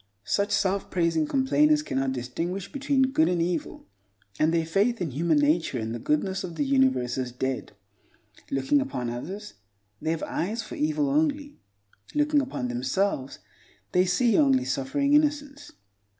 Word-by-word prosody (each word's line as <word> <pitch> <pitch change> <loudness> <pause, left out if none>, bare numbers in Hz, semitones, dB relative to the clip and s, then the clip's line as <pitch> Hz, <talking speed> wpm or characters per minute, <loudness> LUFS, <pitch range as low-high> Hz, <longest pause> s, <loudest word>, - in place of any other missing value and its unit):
Such 200 0 0
self 200 -1 0
praising 165 -3 +1
complainers 300 - +3
cannot 135 - -1
distinguish 165 +10 -4
between 270 -2 +1
good 160 -8 +3
and 180 -1 0
evil, 165 -1 -2 0.5
and 155 +1 +3
their 165 -1 +1
faith 205 +8 +1
in 170 -6 -2
human 160 +3 +1
nature 150 -1 +2
and 110 -1 -3
the 120 - -4
goodness 190 - -1
of 175 -3 -6
the 290 - 0
universe 260 - +2
is 125 -1 -3
dead. 130 -1 -3 0.8
Looking 135 - +2
upon 125 - -3
others, 190 - -7 0.5
they 160 - -2
have 165 -1 -1
eyes 220 +7 -2
for 215 - -10
evil 305 -2 0
only; 290 0 0 0.6
looking 295 0 +3
upon 260 - -4
themselves, 130 +4 -1 0.5
they 180 0 +3
see 235 - +3
only 270 -3 +3
suffering 280 +1 0
innocence. 290 -1 +1
195 Hz, 150 wpm, -26 LUFS, -, 0.8 s, complainers